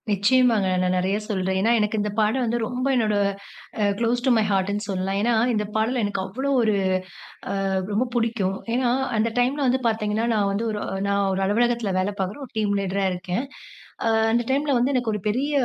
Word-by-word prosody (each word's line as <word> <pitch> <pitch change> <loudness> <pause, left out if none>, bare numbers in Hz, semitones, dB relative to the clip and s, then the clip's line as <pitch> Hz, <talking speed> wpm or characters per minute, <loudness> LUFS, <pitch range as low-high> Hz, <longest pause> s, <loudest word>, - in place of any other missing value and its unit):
நிச்சியமாங்க. 215 0 +3
நான் 185 0 +1
நெறைய 190 +3 0
சொல்றேன். 190 -2 -1
ஏனா, 225 +4 +3
எனக்கு 210 +1 0
இந்த 210 0 -2
பாடல் 220 +5 +2
வந்து 235 +1 -1
ரொம்ப 250 +1 -3
என்னோட 215 -4 +1 0.7
அ - - +3 0.2
"க்ளோஸ் 240 +1 0
டூ 260 - +4
மை 220 - +3
ஹார்ட்டுன்னு" 200 +2 0
சொல்லலாம். 190 0 -1
ஏனா, 235 +2 +2 0.2
இந்த 210 -1 0
பாடல் 230 +3 +1
எனக்கு 205 -1 -1
அவ்வளோ 265 +9 -3
ஒரு, 220 -2 +2 1.0
அ - - 0 0.2
ரொம்ப 225 +5 +1
புடிக்கும். 225 -5 0 0.2
ஏனா, 250 0 +1 0.3
அந்த 220 +2 +2
டைம்ல 260 +4 +1
வந்து 255 +1 +2
பார்த்தீங்கன்னா, 220 0 0
நான் 205 -2 +1
வந்து 205 +4 -2
ஒரு 210 -1 -4 0.3
நான் 200 0 +1
ஒரு 190 0 -1
அலுவலகத்தில 230 0 +1
வேலை 190 +2 0
பார்க்குற 190 +7 -3
ஒரு 245 - -20
டீம் 210 -2 +1
லீடரா 195 0 -1
இருக்கேன். 180 +7 -3 0.6
ஆ - - +2 0.2
அந்த 240 +1 +2
டைம்ல 285 +2 +1
வந்து 250 +3 +1
எனக்கு 245 -3 0
ஒரு 210 - -2
பெரிய 260 +8 0
215 Hz, 190 wpm, -23 LUFS, 200-240 Hz, 1.0 s, டூ